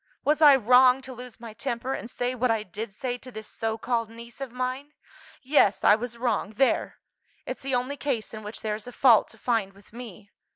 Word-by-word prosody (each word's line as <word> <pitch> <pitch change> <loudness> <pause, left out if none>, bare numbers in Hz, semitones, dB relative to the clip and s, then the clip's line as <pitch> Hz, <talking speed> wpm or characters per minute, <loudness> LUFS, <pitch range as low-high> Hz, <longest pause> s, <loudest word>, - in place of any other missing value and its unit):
Was 300 +2 +2
I 290 -3 +9
wrong 255 +2 +5
to 260 - -8
lose 250 0 -10
my 230 -2 -9
temper, 245 +2 -3
and 235 - -6
say 245 +1 -2
what 250 0 0
I 225 -2 +1
did 210 +2 -7
say 245 +4 -4
to 255 - -11
this 220 -2 -8
so 225 0 -3
called 230 -1 -1
niece 235 +2 -12
of 270 -3 -5
mine? 255 +4 -4 0.5
Yes, 255 -7 +3
I - - +7
was 235 +2 -3
wrong, 225 -3 -1
there: 270 +4 +1 0.5
it's - - -5
the 270 -1 -1
only 255 +3 -2
case 255 -8 -3
in 215 - -7
which 210 +1 -7
there 215 -1 -1
is 210 +2 -7
a - - -7
fault 240 -3 +5
to 225 - -13
find 220 -3 -1
with 200 +2 -21
me. 215 -4 -10
240 Hz, 220 wpm, -26 LUFS, 220-255 Hz, 0.5 s, I